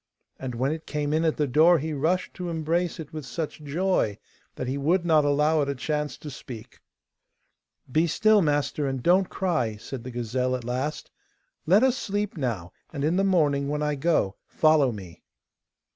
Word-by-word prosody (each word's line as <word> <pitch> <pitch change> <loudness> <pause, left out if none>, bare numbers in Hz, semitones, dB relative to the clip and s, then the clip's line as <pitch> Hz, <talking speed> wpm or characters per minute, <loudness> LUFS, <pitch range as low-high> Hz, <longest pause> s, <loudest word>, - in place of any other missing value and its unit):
And 130 -2 -5
when 130 +4 0
it 160 0 -6
came 150 -1 -2
in 160 +1 +2
at 160 -2 +1
the 150 - +2
door 155 +6 +5
he 155 +1 -3
rushed 160 +6 0
to 180 -1 -5
embrace 165 +2 -1
it 155 -2 -8
with 155 -1 -5
such 145 +5 -5
joy 150 - 0 0.4
that 130 - -4
he 130 - -1
would 170 +6 +1
not 155 -3 +4
allow 150 +2 +3
it 140 - -1
a 140 - -1
chance 150 +3 -2
to 150 - -8
speak. 125 -4 -10 1.1
'Be 160 +5 +3
still, 215 +5 +4
master, 145 -2 0
and 135 -2 -3
don't 185 +2 +4
cry,' 155 - -1
said 115 +3 -7
the 130 - -6
gazelle 125 +1 -1
at 125 - -5
last; 130 +5 -3 0.6
'let 195 +8 +5
us 260 -1 +3
sleep 205 -4 -2
now, 115 - -3 0.2
and 140 -3 -4
in 160 +4 +2
the 195 - +2
morning, 145 -7 +2
when 150 0 -1
I 150 0 0
go, 140 - +1
follow 155 -4 +3
me. 95 -6 -10
150 Hz, 190 wpm, -26 LUFS, 130-165 Hz, 1.1 s, door